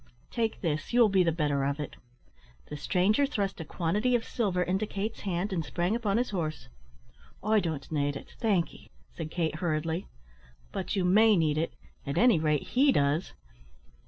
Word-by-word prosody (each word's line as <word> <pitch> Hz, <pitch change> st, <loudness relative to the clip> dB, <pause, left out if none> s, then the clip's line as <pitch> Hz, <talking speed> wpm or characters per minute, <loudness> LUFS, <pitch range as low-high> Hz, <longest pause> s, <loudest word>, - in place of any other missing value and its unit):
"Take 225 Hz, -2 st, -1 dB
this, 155 Hz, +3 st, -2 dB
you 245 Hz, -, +4 dB
will 230 Hz, -3 st, +7 dB
be 195 Hz, -1 st, +4 dB
the 165 Hz, -, +2 dB
better 145 Hz, -4 st, 0 dB
of 140 Hz, +2 st, -1 dB
it." 150 Hz, -, -5 dB, 0.7 s
The -, -, -5 dB
stranger 200 Hz, -, +2 dB
thrust 200 Hz, -, -2 dB
a -, -, -3 dB
quantity 205 Hz, +10 st, 0 dB
of 235 Hz, -, 0 dB
silver 190 Hz, -6 st, 0 dB
into 190 Hz, +4 st, -1 dB
Kate's 210 Hz, +3 st, -4 dB
hand, 190 Hz, +1 st, -2 dB
and 165 Hz, -3 st, -1 dB
sprang 175 Hz, +7 st, -1 dB
upon 220 Hz, -3 st, 0 dB
his 245 Hz, -1 st, 0 dB
horse. 155 Hz, -, -3 dB, 0.7 s
"I 215 Hz, +1 st, +4 dB
don't 160 Hz, -7 st, -4 dB
need 145 Hz, -2 st, 0 dB
it, -, -, -9 dB
thank 200 Hz, -7 st, +1 dB
'ee," -, -, -16 dB, 0.2 s
said 160 Hz, -2 st, -5 dB
Kate, 160 Hz, -2 st, -1 dB
hurriedly. 165 Hz, +1 st, -1 dB, 0.6 s
"But 190 Hz, +3 st, -3 dB
you 190 Hz, -2 st, +1 dB
may 210 Hz, +3 st, +5 dB
need 155 Hz, -2 st, +2 dB
it; 165 Hz, -, -2 dB, 0.3 s
at 140 Hz, 0 st, -3 dB
any 235 Hz, -7 st, +5 dB
rate, 150 Hz, -2 st, +1 dB
he 275 Hz, +3 st, +4 dB
does. 145 Hz, -, +1 dB
180 Hz, 185 wpm, -29 LUFS, 155-210 Hz, 0.7 s, will